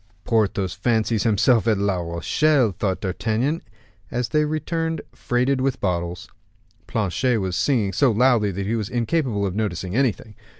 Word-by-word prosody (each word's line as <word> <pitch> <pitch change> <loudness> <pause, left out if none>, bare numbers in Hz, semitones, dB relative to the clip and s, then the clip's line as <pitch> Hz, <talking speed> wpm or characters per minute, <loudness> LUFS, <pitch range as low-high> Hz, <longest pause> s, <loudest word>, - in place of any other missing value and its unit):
"Porthos 100 -5 0
fancies 110 -2 0
himself 115 +1 +3
at 110 -3 +3
La 100 -1 0
Rochelle," 105 - +1
thought 95 0 -2
D'Artagnan, 110 - -1 0.5
as 120 -1 -2
they 150 +5 +2
returned 160 +1 -2
freighted 125 +2 0
with 135 -1 0
bottles. 90 -2 -2 0.6
Planchet 115 +3 0
was 95 -2 -2
singing 110 -7 +1
so 130 +8 +3
loudly 115 -2 +3
that 100 +1 -4
he 110 +4 -1
was 110 -3 -3
incapable 120 -3 0
of 95 - -2
noticing 100 -3 -3
anything. 120 -4 0
110 Hz, 145 wpm, -23 LUFS, 100-130 Hz, 0.6 s, himself